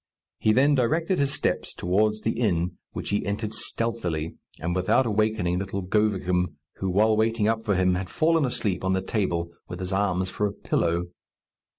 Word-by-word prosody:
He 110 - +3
then 135 +6 +4
directed 160 +8 +1
his 140 -1 +2
steps - - -1
towards 105 +4 +1
the 110 - +1
inn, 90 -6 +1 0.2
which - - -5
he 105 - +1
entered 105 +2 -3
stealthily, 110 -9 -1 0.2
and 85 +3 -2
without 95 +8 +3
awaking 105 -5 +1
little 95 0 -3
Govicum, 90 -4 +1 0.2
who, 95 - -2
while 110 +4 +3
waiting 110 0 +2
up 110 0 +1
for 105 -3 0
him, 90 0 +3
had 90 0 -3
fallen 165 0 +2
asleep 105 -8 -1
on 95 0 +1
the 95 0 0
table, 85 -5 -1 0.2
with 90 - -7
his 95 +1 -3
arms 95 -2 0
for 105 - 0
a 100 - -5
pillow. 85 -1 -1
100 Hz, 180 wpm, -26 LUFS, 90-110 Hz, 0.2 s, then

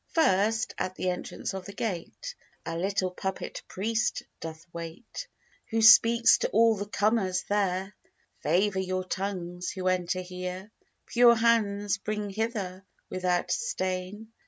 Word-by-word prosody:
First, 225 - +2
at 185 - -2
the 185 - 0
entrance 180 - -5
of 190 -1 -6
the 200 - -8
gate, 225 - -4 0.3
A 165 - -3
little 185 +1 0
puppet 190 +1 -4
priest 220 +4 -1 0.2
doth 160 0 -8
wait, 170 - -7 0.4
Who 225 -1 +1
squeaks 230 +1 +7
to - - 0
all 225 +1 +4
the 205 0 -5
comers 205 -3 +1
there, 195 -1 0 0.5
'Favour 195 +2 +2
your 185 0 -1
tongues, 180 -2 -4
who 185 -1 -3
enter 185 0 0
here. 185 +2 -6 0.3
'Pure 235 0 +6
hands 215 -3 +2
bring 210 0 -3
hither, 200 -3 -3 0.3
without 180 -1 0
stain.' 205 - -3
195 Hz, 135 wpm, -28 LUFS, 185-220 Hz, 0.5 s, squeaks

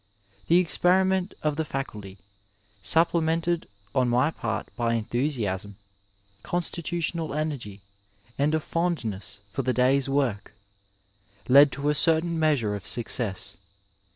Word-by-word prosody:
The 170 - +5
experiment 185 +2 +2
of 150 -1 0
the 160 - 0
Faculty, 105 -9 -6 0.6
supplemented 165 - +1 0.3
on 125 -2 +2
my 125 +6 +2
part 110 -7 -4
by 115 -1 0
enthusiasm, 110 -5 -2 0.7
constitutional 170 -2 -3
energy, 135 -10 -4 0.5
and 150 +3 +1
a - - +1
fond 165 -4 -1
ness 100 -1 -5
for 120 +7 -3
the 130 0 0
day's 130 +2 +2
work, 130 -8 -1 0.9
led 140 +2 +7
to 140 +2 -1
a - - +3
certain 165 +2 +2
measure 145 -10 +2
of 100 -2 -6
success. 115 -4 -1
140 Hz, 120 wpm, -26 LUFS, 115-165 Hz, 0.9 s, led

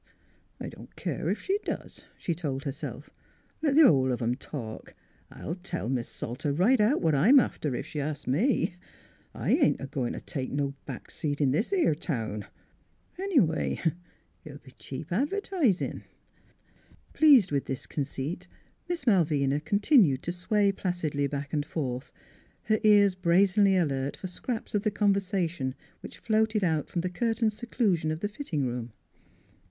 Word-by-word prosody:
" - - -38
I - - -5
don't - - -12
care - - -3
ef - - +1
she 395 +2 0
does," - - -6
she 170 - -2
told 145 -5 -4
herself. 140 +2 -6 0.5
"Let 295 -3 +2
th' 320 - +8
hull 130 - +5
of 125 - -1
'em 120 0 0
talk! 120 -4 -7 0.3
I'll 165 - -6
tell 175 - -5
Mis' 125 -3 -1
Salter 135 +5 -4
right 210 - +3
out 230 +8 +3
what 160 -2 +2
I'm 220 - +6
after, 150 - -1
ef - - -4
she 150 - -4
asks 150 +1 -4
me. 180 - +1 0.6
I - - -1
ain't - - +3
a 135 - -5
goin' 135 -3 -3
t' - - -5
take 135 -5 -4
no 140 0 -1
back 130 -4 -8
seat 145 -2 -3
in 140 -3 +3
this 165 - 0
'ere 360 - +3
town. 115 - -4 0.7
Any 385 -6 +3
way, 160 -7 0 0.6
it'll 150 -3 -9
be 135 -2 -17
cheap 140 +6 -8
advertisin'." 290 - 0 1.1
Pleased 275 - +6
with 140 -2 0
this 135 +1 -4
conceit, 140 +3 -4 0.4
Miss 345 -6 -3
Malvina 150 - +3
con 200 +6 0
tinued 195 - +5
to 175 - -2
sway 200 +3 +1
placidly 165 -7 -1
back 140 0 -5
and 145 -1 +1
forth, 130 -4 -4 0.5
her 215 -1 +1
ears 205 -2 +6
brazenly 190 +2 +3
alert 140 -5 -1
for - - -8
scraps 220 +6 -4
of 205 - +2
the 215 - +1
conversation 190 -9 0 0.2
which - - -10
floated 220 -1 +1
out 160 -4 0
from 175 - -1
the 185 - -2
curtained 225 +2 0
seclusion 210 -7 0
of 155 +1 -3
the 205 - -1
fitting 180 - -3
room. 120 -2 -4
170 Hz, 165 wpm, -28 LUFS, 140-210 Hz, 1.1 s, th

